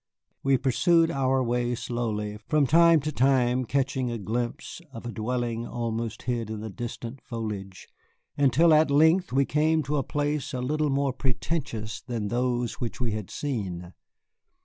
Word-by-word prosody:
We 135 -1 +3
pursued 150 +6 +3
our 135 -1 +1
way 120 0 0
slowly, 110 -4 -3
from 150 -2 +3
time 165 +2 +6
to 155 +2 -2
time 130 -2 +2
catching 135 0 0
a 120 - -3
glimpse 120 - -4
of 115 -2 -9
a 120 - -4
dwelling 120 0 -2
almost 115 -2 -3
hid 120 -3 -2
in 110 -1 -5
the 110 -1 -6
distant 120 +2 -6
foliage, 105 -6 -6 0.5
until 145 +4 +4
at 155 0 +5
length 160 +5 +4
we 135 +2 +3
came 155 +2 +2
to 145 +2 -1
a 140 - +1
place 145 -1 -2
a - - -2
little 150 +4 0
more 140 -1 +1
pretentious 125 -4 -3
than 115 -4 -3
those 120 0 -1
which 120 - -4
we 120 -2 -1
had 105 -2 -4
seen. 95 -10 -4
125 Hz, 160 wpm, -27 LUFS, 115-140 Hz, 0.5 s, time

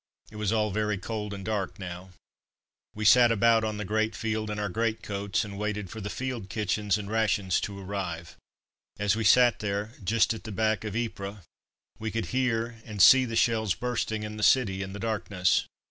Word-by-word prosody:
It 105 - -10
was 105 -2 -1
all 105 -2 +1
very 105 0 0
cold 105 +1 -5
and 100 -1 -7
dark 100 -3 -2
now. 90 0 -7 0.9
We 105 0 -3
sat 120 +2 +7
about 115 +1 +4
on 110 -1 -2
the 105 - -4
great 110 +2 0
field 110 0 -2
in 105 - -3
our 105 0 -1
greatcoats 100 -1 -2
and 100 -1 -8
waited 105 -3 -3
for 110 - -7
the 100 - -4
field 125 -6 -4
kitchens 105 -1 0
and 105 -1 -6
rations 105 -3 +1
to 100 -1 -5
arrive. 90 -4 -5 0.6
As 105 0 +1
we 115 - -2
sat 120 +3 +5
there, 105 +1 -2
just 110 +4 +2
at 110 - -9
the 110 - -7
back 110 +1 0
of 105 -1 -5
Ypres, 100 -4 -4 0.6
we 110 0 -3
could 115 -1 -2
hear 120 -3 0
and 105 -3 -8
see 130 +8 +8
the 115 -2 -4
shells 110 -4 +2
bursting 115 -3 -2
in 105 0 -6
the - - -5
city 105 -5 +3
in 95 0 -5
the - - -6
darkness. 100 -4 0
105 Hz, 195 wpm, -28 LUFS, 100-110 Hz, 0.9 s, see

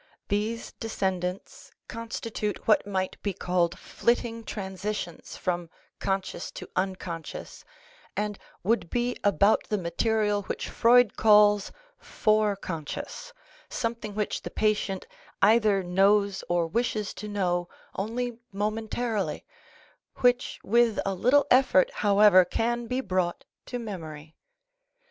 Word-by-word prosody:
These 215 +3 -1
descendants 190 -4 -3 0.2
constitute 225 -2 -4
what 215 -2 +4
might 190 -2 -2
be 200 - -2
called 175 -1 0
flitting 235 -1 -1
transitions 190 -3 -5
from 175 -2 -2 0.3
conscious 195 -3 -2
to - - -8
unconscious 185 -3 -4 0.5
and 210 0 -2 0.2
would 210 -3 +1
be 245 0 0
about 200 +1 +3
the 210 - -1
material 205 +4 0
which - - -5
Freud 240 -2 +5
calls 210 -1 +5 0.2
" - - -45
fore 215 -2 +1
conscious," 185 - -6 0.4
something 230 -3 -3
which 210 -1 -2
the - - -6
patient 210 -3 0 0.3
either 210 -2 +4
knows 195 +2 +3
or 175 -1 +2
wishes 215 +3 -1
to 210 - -7
know 180 -4 -1 0.3
only 230 +4 -3
momentarily, 215 -2 -2 0.7
which 245 0 +2
with 235 0 +3
a 195 - 0
little 260 +9 +4
effort, 255 -7 +5
however, 200 -2 +6
can 235 +6 -1
be 255 +3 -1
brought 185 -5 -1 0.2
to 245 - -4
memory. 160 -9 -7
205 Hz, 115 wpm, -27 LUFS, 185-225 Hz, 0.7 s, however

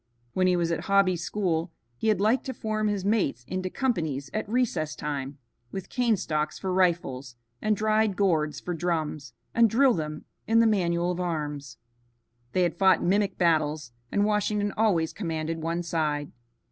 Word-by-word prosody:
When 185 0 +2
he 180 - +3
was 170 -1 0
at 165 - -2
Hobby's 195 -3 +3
school 175 -4 -1 0.2
he 220 - -3
had 215 -4 +3
liked 220 +6 +2
to 260 - -4
form 215 -1 -1
his 205 -2 -1
mates 200 - +1
into 185 0 -3
companies 160 - -2
at 215 -1 -3
recess 210 -11 0
time, 140 -1 -4 0.3
with 190 -2 -6
cane 240 -4 +2
stalks 155 -4 -2
for 190 -2 -3
rifles 165 -9 0 0.3
and 215 -1 +1
dried 215 -1 +2
gourds 160 -7 +1
for 180 - -4
drums, 160 -4 -2 0.2
and 230 -1 +5
drill 255 +4 +4
them 155 -3 -4 0.2
in 225 +1 +4
the 230 - +5
manual 175 -5 +2
of 180 - -4
arms. 150 -6 -3 0.8
They 185 - +3
had 170 -1 -1
fought 190 -3 +5
mimic 200 +1 +1
battles, 155 -5 +1 0.2
and 205 - +2
Washington 210 -1 +1
always 185 -8 +2
commanded 165 -3 -3
one 165 +2 -2
side. 150 -3 -1
180 Hz, 170 wpm, -27 LUFS, 155-210 Hz, 0.8 s, and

